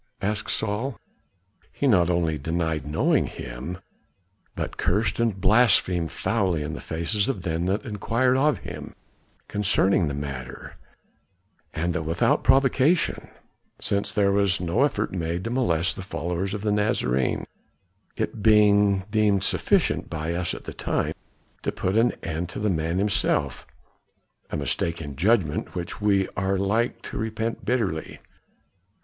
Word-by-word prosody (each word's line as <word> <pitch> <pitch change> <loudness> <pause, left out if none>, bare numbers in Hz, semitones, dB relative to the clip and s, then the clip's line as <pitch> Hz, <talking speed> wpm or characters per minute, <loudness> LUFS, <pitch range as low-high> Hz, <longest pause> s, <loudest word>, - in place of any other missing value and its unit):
asked 105 +1 -1
Saul. 110 +4 -1 0.7
"He - - -3
not 90 -9 +4
only 85 -3 +1
denied 80 0 -2
knowing 75 +2 +2
him, 65 +9 -7 0.8
but - - -4
cursed 105 +3 0
and 115 -5 +1
blasphemed 95 -5 +3
foully 95 -9 0
in 75 +1 -4
the - - -6
faces 95 +8 -1
of 135 - -3
them 85 0 -1
that 100 +7 -1
inquired 115 +4 +1
of 145 +2 +3
him - - -7 0.5
concerning 95 -3 +2
the 70 - -3
matter, 70 -3 -6 1.0
and 85 +2 -1
that 90 - -1
without 80 +1 +1
provocation, 135 +5 +3 0.5
since 100 0 -1
there 100 -2 +2
was 100 -2 +2
no 90 +7 0
effort 110 -7 0
made 85 0 -2
to 115 - -3
molest 95 -9 +1
the - - -6
followers 90 +1 -3
of 105 - -6
the 105 - +1
Nazarene, 65 - +1 0.7
it 110 - -3
being 105 -2 +5
deemed 105 -3 +3
sufficient - - +1
by 80 +1 -3
us 85 0 -2
at - - -10
the - - -7
time - - -1 0.5
to - - -1
put 95 +2 -2
an 115 +2 +4
end 85 +1 -3
to 105 - -6
the 105 -1 +1
man 80 +1 -1
himself 95 -9 0 0.8
a - - -3
mistake 80 +3 -1
in 75 -4 -7
judgment 95 - +1
which 90 +3 -5
we 100 -2 +3
are 95 +1 0
like 105 +5 0
to - - -6
repent 110 +1 -3
bitterly." 105 -11 -1
95 Hz, 145 wpm, -25 LUFS, 85-105 Hz, 1.0 s, being